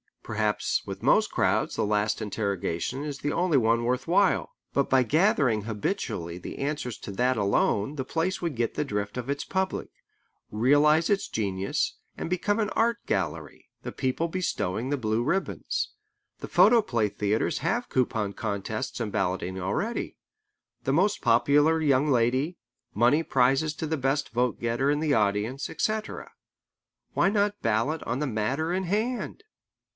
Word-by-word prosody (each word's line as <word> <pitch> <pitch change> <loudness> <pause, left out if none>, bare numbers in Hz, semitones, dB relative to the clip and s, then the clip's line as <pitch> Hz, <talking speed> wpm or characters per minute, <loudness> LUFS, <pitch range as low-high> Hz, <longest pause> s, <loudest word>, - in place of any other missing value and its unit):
Perhaps 110 -1 0
with - - -7
most - - +4
crowds - - +1
the - - 0
last 105 +1 0
interrogation 100 - -2
is 145 -2 -5
the 145 - -2
only 175 -4 +2
one 115 -1 +2
worth 125 +4 -1
while. 185 +3 +2 0.2
But 140 - +1
by 130 -1 +4
gathering 140 - +2
habitually 100 -5 -3
the 90 - -8
answers 140 -5 -3
to - - -7
that 125 +5 +1
alone 105 +5 +1
the 130 - -2
place 170 +7 -1
would 170 -5 -2
get 115 -1 -1
the 150 - -1
drift 105 -2 -3
of 125 +1 -4
its 140 0 -1
public, 190 0 -2 0.6
realize 145 +8 +4
its 200 -1 +1
genius, 100 -3 -1 0.2
and - - -4
become 205 +4 0
an 210 -1 +1
art 230 0 +2
gallery, 80 -5 -3
the - - -5
people 130 +6 -1
bestowing 130 - -2
the 145 - 0
blue 110 -2 0
ribbons. 190 +10 -1 0.5
The - - -6
photoplay 200 - +4
theatres 105 +2 0
have 240 +1 -1
coupon 110 -5 0
contests 105 +2 -4
and 110 -3 -2
balloting 95 -2 -1
already: 100 - -2 0.7
the 135 - 0
most 190 +7 +2
popular 145 +7 +4
young 145 -1 +3
lady, 130 +6 +1 0.4
money 120 +8 +4
prizes 135 +2 +2
to 160 - -4
the 160 0 -1
best 135 +2 0
vote 120 0 0
getter 120 +4 +1
in 145 0 +2
the 155 -2 +2
audience, 105 +5 0
etc. 215 0 -3 0.8
Why - - +3
not 205 0 0
ballot 115 +9 0
on 115 - -2
the 150 - -1
matter 135 +9 -1
in 190 +1 -1
hand? 220 - -2
130 Hz, 155 wpm, -27 LUFS, 110-160 Hz, 0.8 s, most